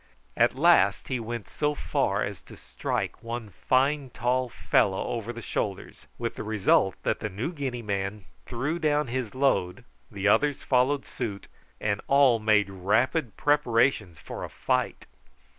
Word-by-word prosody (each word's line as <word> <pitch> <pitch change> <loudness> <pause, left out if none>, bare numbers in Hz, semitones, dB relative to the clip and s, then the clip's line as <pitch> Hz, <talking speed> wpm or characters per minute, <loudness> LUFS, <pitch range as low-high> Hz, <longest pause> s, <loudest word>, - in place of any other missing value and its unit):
At - - +3
last - - +4
he 130 - -1
went 115 -1 -5
so 150 0 -1
far 110 -9 0
as 100 -2 -5
to - - -11
strike - - -4
one 115 -2 -6
fine 135 +4 +1
tall 125 +1 0
fellow 95 -3 +1
over 115 -1 -3
the 120 -1 -8
shoulders, 100 -2 -4
with - - -3
the - - -6
result 105 -3 +2
that - - 0
the 110 - -3
New 110 - -4
Guinea 130 -6 -4
man 100 -1 -3 0.2
threw 140 +8 -2
down 150 -4 +1
his 125 -1 -3
load, 125 -5 +1 0.2
the 100 -2 -2
others 145 +6 +3
followed 135 +2 +2
suit, 105 -5 -5 0.3
and 105 -1 -1
all 135 -4 +5
made 105 -2 +3
rapid 110 - 0
preparations 125 - +2
for - - -7
a - - -5
fight. - - -1
120 Hz, 155 wpm, -27 LUFS, 105-135 Hz, 0.3 s, all